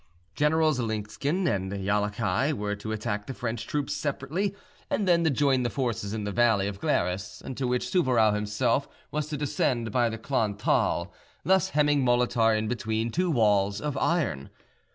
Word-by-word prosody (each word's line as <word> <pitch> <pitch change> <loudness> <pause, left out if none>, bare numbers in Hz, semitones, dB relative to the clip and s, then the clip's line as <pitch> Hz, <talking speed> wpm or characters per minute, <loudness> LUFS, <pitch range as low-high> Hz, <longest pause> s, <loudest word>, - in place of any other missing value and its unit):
Generals 155 -1 +2
Linsken 115 - -2
and 95 -7 -1
Jallachieh 105 +5 0
were 105 -5 -2
to 105 +2 -6
attack 105 -1 -3
the 135 - -5
French 115 -1 -4
troops 145 -1 -2
separately 155 +8 -2 0.3
and 205 - 0
then 170 -1 +4
to 160 - +3
join 140 -2 +2
the 120 - 0
forces 120 -6 -2
in 110 -1 -3
the 105 - -3
valley 110 -3 +3
of 100 -1 -5
Glaris, 95 -1 -1
into 130 0 -4
which 125 0 0
Souvarow 125 - +3
himself 110 +6 0 0.2
was 150 0 -2
to 150 -1 -4
descend 125 -5 -1
by 120 +1 +2
the 115 - -5
Klon 110 -4 -1
Thal, 105 - +1 0.3
thus 190 +1 +3
hemming 145 -2 +3
Molitor 120 -3 +3
in 110 0 -2
between 110 -1 -2
two 180 +5 0
walls 105 -7 +2
of 150 -2 -3
iron. 140 - 0
120 Hz, 170 wpm, -27 LUFS, 105-145 Hz, 0.3 s, then